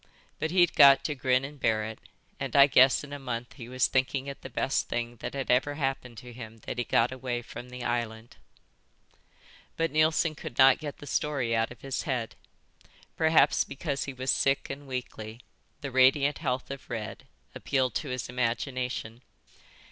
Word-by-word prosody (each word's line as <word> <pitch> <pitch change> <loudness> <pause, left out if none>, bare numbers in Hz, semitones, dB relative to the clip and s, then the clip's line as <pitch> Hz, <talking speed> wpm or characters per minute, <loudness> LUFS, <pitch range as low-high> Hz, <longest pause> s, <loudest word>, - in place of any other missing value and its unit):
But 155 - -1
he'd 175 -1 +4
got 140 -2 +7
to 150 - -1
grin 130 -1 +1
and 145 +1 -10
bear 110 -3 +1
it, 110 0 -7 0.4
and 135 -3 -4
I 140 -1 +9
guess 130 -1 +5
in 145 -1 -9
a 145 - -5
month 120 -3 -5
he 120 -4 -10
was 130 0 +2
thinking 130 +1 0
it 140 0 -7
the 130 - -8
best 135 +2 -1
thing 120 0 -3
that - - -6
had 135 -2 -1
ever 135 +4 +2
happened 135 -4 -3
to 125 +1 -10
him 115 -2 -9
that 125 - -4
he - - +1
got 120 +1 +2
away 125 -2 -4
from 120 +2 -9
the 125 0 -7
island." 120 -1 -3 1.4
But 165 0 0
Neilson 155 +1 +2
could 130 -5 -9
not 135 +2 +7
get 150 -2 -6
the - - -11
story 140 -6 -1
out 115 +1 +1
of 125 - -13
his 135 -1 -3
head. 120 -4 -2 0.8
Perhaps 160 0 +4
because 140 0 -4
he 135 - -6
was 130 0 -1
sick 135 0 +1
and 140 +1 -8
weakly, 120 -3 -6 0.4
the 140 - -5
radiant 135 +3 +4
health 130 -4 -2
of 140 -1 -8
Red 115 -3 -6 0.3
appealed 130 -2 0
to - - -3
his 125 -2 -3
imagination. 125 -1 -3
130 Hz, 185 wpm, -28 LUFS, 120-140 Hz, 1.4 s, I